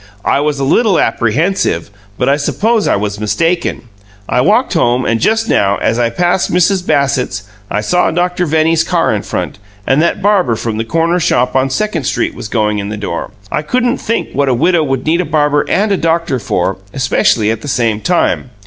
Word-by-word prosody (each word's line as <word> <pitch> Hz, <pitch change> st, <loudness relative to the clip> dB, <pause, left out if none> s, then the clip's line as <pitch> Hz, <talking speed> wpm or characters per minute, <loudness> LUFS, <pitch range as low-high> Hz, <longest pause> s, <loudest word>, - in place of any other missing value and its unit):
"I -, -, +2 dB
was 145 Hz, -1 st, -1 dB
a -, -, -1 dB
little 195 Hz, -, +2 dB
apprehensive, 120 Hz, -, 0 dB, 0.3 s
but -, -, 0 dB
I 140 Hz, -, +4 dB
suppose 210 Hz, +9 st, 0 dB
I -, -, +2 dB
was 100 Hz, 0 st, -3 dB
mistaken. 165 Hz, +11 st, -1 dB, 0.4 s
I -, -, +1 dB
walked -, -, +2 dB
home, 120 Hz, +1 st, +1 dB
and 115 Hz, -1 st, 0 dB
just 225 Hz, -, +1 dB
now, 100 Hz, -, +2 dB
as 115 Hz, +2 st, 0 dB
I 120 Hz, -1 st, +2 dB
passed 175 Hz, +9 st, 0 dB
Mrs. 180 Hz, +2 st, +2 dB
Bassett's, 130 Hz, -, 0 dB, 0.3 s
I 105 Hz, -, -1 dB
saw 180 Hz, +12 st, +1 dB
Doctor 180 Hz, +1 st, -1 dB
Venny's 160 Hz, +1 st, +2 dB
car -, -, +1 dB
in -, -, -1 dB
front, -, -, -4 dB, 0.3 s
and 135 Hz, +3 st, +2 dB
that 170 Hz, -, +1 dB
barber 195 Hz, -, +2 dB
from 110 Hz, -1 st, -3 dB
the 115 Hz, -, -2 dB
corner 165 Hz, +6 st, +1 dB
shop 125 Hz, -6 st, +1 dB
on 135 Hz, 0 st, +2 dB
Second 165 Hz, 0 st, -2 dB
Street -, -, -1 dB
was -, -, -7 dB
going 105 Hz, -1 st, 0 dB
in 100 Hz, 0 st, -4 dB
the 105 Hz, -, -5 dB
door. 100 Hz, -5 st, -4 dB, 0.2 s
I 150 Hz, -, 0 dB
couldn't 245 Hz, +9 st, 0 dB
think 230 Hz, +1 st, -2 dB
what 140 Hz, 0 st, +1 dB
a 125 Hz, -, +2 dB
widow 165 Hz, +5 st, +2 dB
would 135 Hz, -3 st, -2 dB
need 165 Hz, +3 st, +2 dB
a -, -, -1 dB
barber 150 Hz, -3 st, +1 dB
and 210 Hz, +1 st, +1 dB
a 195 Hz, -, +2 dB
doctor 165 Hz, -5 st, 0 dB
for 95 Hz, -3 st, -1 dB, 0.2 s
especially 120 Hz, -4 st, +2 dB
at 115 Hz, -, -4 dB
the -, -, -8 dB
same 115 Hz, -5 st, 0 dB
time. 175 Hz, -5 st, 0 dB
145 Hz, 205 wpm, -14 LUFS, 115-175 Hz, 0.4 s, I